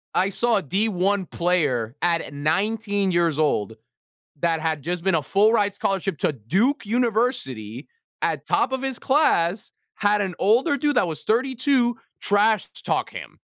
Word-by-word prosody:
I 190 +2 +2
saw 235 +3 +1
a - - 0
D1 195 +2 0
player 145 -9 0
at 170 -4 0
19 200 +6 0
years 170 -3 +1
old 110 -8 0 0.7
that 165 -1 +1
had 155 -3 -2
just 175 +1 -3
been 190 - +2
a 155 - +1
full-ride 205 +3 +2
scholarship 195 -4 -2
to - - 0
Duke 190 - 0
University 215 - -1 0.3
at - - -1
top 265 - +1
of 265 0 -2
his 265 -2 -3
class, 220 - +1 0.2
had 205 0 +1
an 190 -3 -2
older 235 +8 +3
dude 290 -1 0
that 185 - +3
was 160 - -5
32 250 +1 +1 0.2
trash 210 0 +3
t - - -13
talk - - -1
him. - - -10
195 Hz, 155 wpm, -23 LUFS, 165-230 Hz, 0.7 s, older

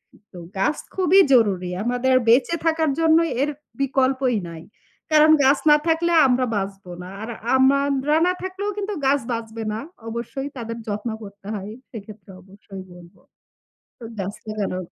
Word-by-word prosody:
এ - - -19 0.2
তো 180 - -11 0.2
গাছ 295 +10 +1 0.2
খুবই 375 +1 +4
জরুরি। 195 -7 +3
আমাদের 245 +2 +1
বেঁচে 250 +8 +4
থাকার 320 -2 +2
জন্য 325 -1 +4 0.2
এর 290 - +1 0.3
বিকল্পই 265 -3 +1
নাই। 165 -1 -10 0.5
কারণ 310 0 +6
গাছ 275 +2 +4
না 295 - +8
থাকলে 330 +1 +1 0.2
আমরা 255 0 +2
বাঁচব 195 0 -4 0.2
না। - - -9
আর 225 - -6 0.3
আমরা 275 +2 +2
না 360 - +2
থাকলেও 375 +2 -4
কিন্তু 410 0 -3
গাছ 275 +1 +3
বাঁচবে 225 -1 -5
না। 220 - -3 0.3
অবশ্যই 240 +4 -5
তাদের 230 -1 -5
যত্ন 210 +2 -3
করতে 200 -1 -13
হয়। 200 +1 -6 0.2
সেক্ষেত্রে 210 -3 -11
অবশ্যই 195 0 -12
বলব। 175 0 -15 0.8
তো - - -12 0.2
গাছ 195 +1 -4
লাগানো 210 -3 -3
245 Hz, 155 wpm, -22 LUFS, 205-290 Hz, 0.8 s, না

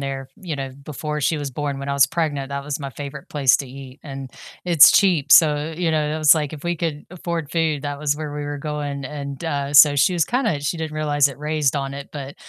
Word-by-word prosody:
there, 135 -1 -5
you 170 -5 -5
know, 135 -1 -5
before 150 +2 -6
she 155 +2 0
was 145 -1 -4
born, 140 +1 -4
when 140 0 -6
I - - -1
was 140 -1 +6
pregnant, 145 -4 -2
that 140 0 -5
was 150 0 -4
my 140 -1 -5
favorite 140 0 -8
place 140 -4 +3
to 140 - -5
eat, 135 +1 -11
and 135 -2 -7 0.4
it's 170 -4 +8
cheap, 180 -8 +3
so, 150 0 +5
you 170 -1 -1
know, 150 -1 0
it 155 - -3
was 155 +1 +6
like 150 -3 -2
if 150 -2 -9
we 175 0 0
could 155 -3 -4
afford 170 -4 -5
food, 160 -4 0
that 145 -1 -4
was 145 -1 0
where 150 -1 -6
we 150 - -4
were 145 0 -5
going, 145 -2 -4
and, 140 0 -7
uh, 140 -3 -2
so 145 0 +8
she 160 +7 +3
was 170 -3 +2
kinda, 240 - -1
she 145 +4 -2
didn't 160 -1 -5
realize 145 -2 +2
it, 140 - -10
raised 150 -2 0
on 135 0 -3
it, 140 0 -8
but 140 -1 -7
145 Hz, 250 wpm, -21 LUFS, 140-155 Hz, 0.4 s, it's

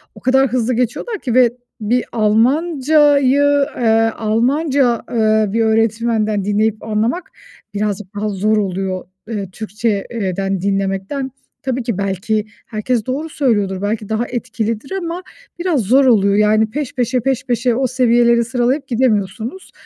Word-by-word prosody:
o - - -12
kadar 265 +1 +3
hızlı 250 0 0
geçiyorlar 250 - -2
ki 245 -4 -3
ve 245 -2 +4 0.3
bir 240 +4 +1
Almanca'yı, 285 +4 +3
eee, 225 -1 +3
Almanca, 245 +3 +1
eee, 220 -2 +2
bir 230 - +1
öğretmenden 220 -1 +1
dinleyip 215 +1 0
anlamak 225 +11 -1 0.4
birazcık 205 -1 -2
daha 210 +1 -2
zor 210 +2 +1
oluyor, 190 -2 -2 0.2
eee, 205 -4 -4
Türkçe 215 0 -2
eee, 195 -6 -2
den 195 -2 -2
dinlemekten. 195 +7 -2 0.3
Tabii 260 -1 -2
ki 230 -5 -2
belki 200 +2 -1 0.2
herkes 220 +1 -2
doğru 290 +5 -3
söylüyordur, 205 -10 0
belki 210 0 -2
daha 220 +2 -1
etkilidir 230 - -3
ama 360 -1 -4 0.4
biraz 345 -8 +1
zor 260 +7 +4
oluyor. 200 -5 +4
Yani, 215 +1 +3
peş 285 +2 -4
peşe, 250 0 0
peş 265 +1 -1
peşe 240 -1 +1
o 260 +1 +1
seviyeleri 240 -1 +3
sıralayıp 255 +3 -1
gidemiyorsunuz. 230 - -1
230 Hz, 140 wpm, -17 LUFS, 210-260 Hz, 0.4 s, ve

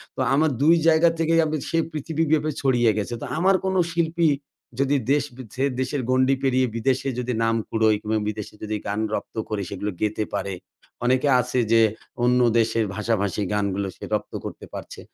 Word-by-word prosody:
তো - - -9
আমার 155 +3 +3
দুই 160 +4 +6
জায়গা 165 +1 +5
থেকেই 165 0 +3
আমি 155 0 -1
সে 165 - 0
পৃথিবীব্যাপী 155 0 0
ছড়িয়ে 120 -4 +3
গেছে। 105 +3 -2
তো - - -4
আমার 190 +4 +4
কোন 190 0 0 0.2
শিল্পী 170 0 +1 0.5
যদি 140 +1 +2 0.2
দেশ 145 -1 +3
বি 130 - -8
ছেড়ে 130 - -1 0.2
দেশের 130 +2 -1
গণ্ডি 130 +1 +3
পেরিয়ে 130 -1 +2
বিদেশে 130 +3 0
যদি 125 0 -2
নাম 115 0 +2
কুড়োয় 110 -1 +3
কিংবা 110 +1 -1
বিদেশে 105 -1 -6
যদি 110 0 -2
গান 100 +1 -1
রপ্ত - - -4
করে 105 -2 -2
সেগুলো 100 +1 -3
গেতে 110 0 0
পারে। 100 0 -2 0.5
অনেকে 130 +3 +2
আছে 125 +1 0
যে 115 0 +6 0.4
অন্য 125 +1 +4 0.2
দেশের 115 0 +1
ভাষাভাষী 105 -1 -1
গানগুলো 100 -1 -1
সে - - -13
রপ্ত - - -2
করতে - - -7
পারছে। - - -8
130 Hz, 180 wpm, -24 LUFS, 110-150 Hz, 0.5 s, দুই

